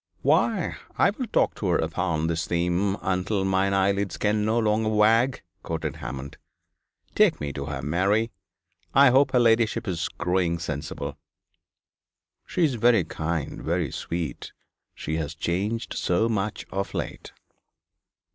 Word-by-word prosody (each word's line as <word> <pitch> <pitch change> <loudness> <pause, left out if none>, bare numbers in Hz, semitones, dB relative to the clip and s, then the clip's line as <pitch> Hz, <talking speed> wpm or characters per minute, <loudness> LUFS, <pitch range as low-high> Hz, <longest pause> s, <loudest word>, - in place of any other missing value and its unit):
'"Why, - - +2 0.2
I - - +4
will 255 -5 -5
talk - - +2
to 100 - -2
her 85 - +3
upon 80 0 -1
this 80 -1 -1
theme 90 +3 0
until 95 +2 0
mine 95 +1 +2
eyelids 100 -1 +1
can 105 0 +1
no 110 +2 +1
longer 110 -1 +2
wag,"' 115 +4 +3 0.2
quoted 80 -3 -4
Hammond. 70 +1 -7 0.7
'Take - - +4
me 70 -1 -4
to 70 - -4
her, 70 -2 -5
Mary. 100 - +1 0.6
I 140 -1 +7
hope 135 +3 +5
her 125 - +4
ladyship 115 -2 +2
is 85 -3 -2
growing 90 -1 0
sensible.' 75 -3 -5 1.3
'She 180 - 0
is 150 -5 +3
very 115 -5 +5
kind, 80 -1 -3
very 85 -4 -1
sweet. 85 -4 -4 0.4
She 80 +1 -3
has 80 -1 -3
changed 100 +8 -2
so 90 +6 +1
much 105 -2 -2
of 100 +1 -3
late.' - - -5
95 Hz, 140 wpm, -25 LUFS, 80-110 Hz, 1.3 s, I